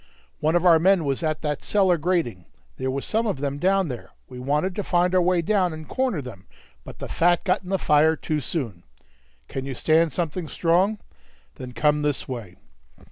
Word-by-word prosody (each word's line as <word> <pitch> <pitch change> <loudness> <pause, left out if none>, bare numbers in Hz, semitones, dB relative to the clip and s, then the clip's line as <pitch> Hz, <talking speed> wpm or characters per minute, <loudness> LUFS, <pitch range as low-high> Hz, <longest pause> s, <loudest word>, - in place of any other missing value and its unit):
One 155 +2 +1
of 175 +1 +2
our 165 -2 +7
men 185 -1 +3
was 135 +1 -1
at 155 -1 -2
that 150 -2 -2
cellar 190 -4 +2
grating; 150 - -1 0.3
there 130 0 -2
was 135 +1 -3
some 225 +1 0
of 200 - -1
them 140 +1 -3
down 190 +2 +2
there; 125 -5 -7 0.2
we 125 -1 -10
wanted 150 +8 0
to 205 - -1
find 180 0 +1
our 185 - +4
way 175 -1 +2
down 185 -2 +1
and 155 0 -9
corner 255 - -1
them, 100 -7 -11 0.4
but - - -11
the - - -6
fat 175 +1 +2
got 185 - +1
in 180 - -11
the 195 - +1
fire 155 -1 +3
too 155 -1 -2
soon. 120 - -3 0.7
Can 135 - -5
you 135 - -4
stand 160 +4 +2
something 165 +3 -3
strong? 180 +7 +1 0.6
Then 125 -1 -8
come 150 +2 +2
this 145 -1 -1
way." 115 -9 -7
160 Hz, 200 wpm, -24 LUFS, 140-180 Hz, 0.7 s, our